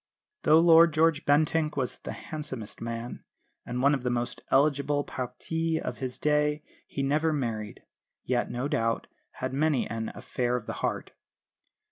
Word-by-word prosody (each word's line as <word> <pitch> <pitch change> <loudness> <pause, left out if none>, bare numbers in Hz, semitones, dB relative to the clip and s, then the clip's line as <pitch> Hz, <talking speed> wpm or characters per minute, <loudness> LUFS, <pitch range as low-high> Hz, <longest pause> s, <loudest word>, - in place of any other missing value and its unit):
Though 155 - +6
Lord 165 -1 +7
George 160 -1 +3
Bentinck 155 +1 +2
was 130 -3 -2
the - - -6
handsomest 135 -8 -6
man, 115 +1 -5 0.4
and 125 +1 -2
one 140 +1 +5
of 135 - 0
the 125 - -1
most 120 0 -2
eligible 145 +1 +3
partis 160 +7 -2
of - - -5
his 130 -2 -4
day 150 0 +1 0.2
he 140 - -3
never 155 +4 +2
married; 115 -8 -3 0.4
yet, 120 -1 0
no 125 +3 -2
doubt, 115 -4 0
he - - -41 0.2
had 130 0 -4
many 145 -1 +1
an 115 -1 -4
"affair 125 -1 -1
of 125 - -3
the - - -4
heart." - - -2
140 Hz, 160 wpm, -28 LUFS, 125-155 Hz, 0.4 s, Lord